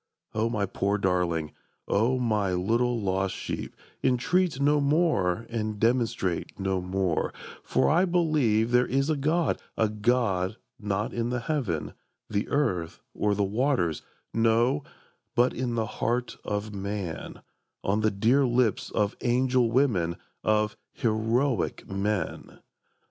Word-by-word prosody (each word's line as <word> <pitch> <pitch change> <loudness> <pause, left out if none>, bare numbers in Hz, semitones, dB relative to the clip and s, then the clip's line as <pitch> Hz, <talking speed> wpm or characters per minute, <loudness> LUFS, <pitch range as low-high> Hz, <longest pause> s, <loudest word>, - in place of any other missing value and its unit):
O 110 +2 +1
my 105 -4 0
poor 100 +1 0
darling, 90 -5 0 0.4
O 115 +6 +2
my 105 -6 +1
little 115 +6 +1
lost 95 -1 -1
sheep, - - -5 0.3
Entreat 175 +5 +2
no 145 +1 +3
more 140 - +2
and 110 -2 -3
demonstrate 115 -7 0
no 95 -1 0
more; 90 -2 0 0.3
For - - +1
I 175 +5 +4
believe 150 - +2
there 125 0 +4
is 135 +3 +1
a - - +2
God, 155 +3 +1 0.2
a 110 - +2
God 105 -3 +1 0.2
Not 105 0 -2
in 120 0 -1
the 125 -1 -1
heaven, 115 - -2 0.3
the 105 +1 -2
earth, 95 - 0
or 105 -1 +1
the 100 - +1
waters; 105 - +1 0.3
no, 115 +5 +2 0.5
But 120 +1 +3
in 120 -1 -2
the 115 -1 0
heart 120 +3 -2
of 105 +1 -3
man, 100 -3 -5 0.4
on 105 +3 +1
the 110 - +3
dear 115 +8 +3
lips 120 -3 +1
Of 105 0 0
angel 125 0 +2
women, 105 -10 +2 0.3
of 105 0 +2 0.2
heroic 115 +2 0
men! 100 +1 -2
110 Hz, 130 wpm, -27 LUFS, 100-125 Hz, 0.5 s, I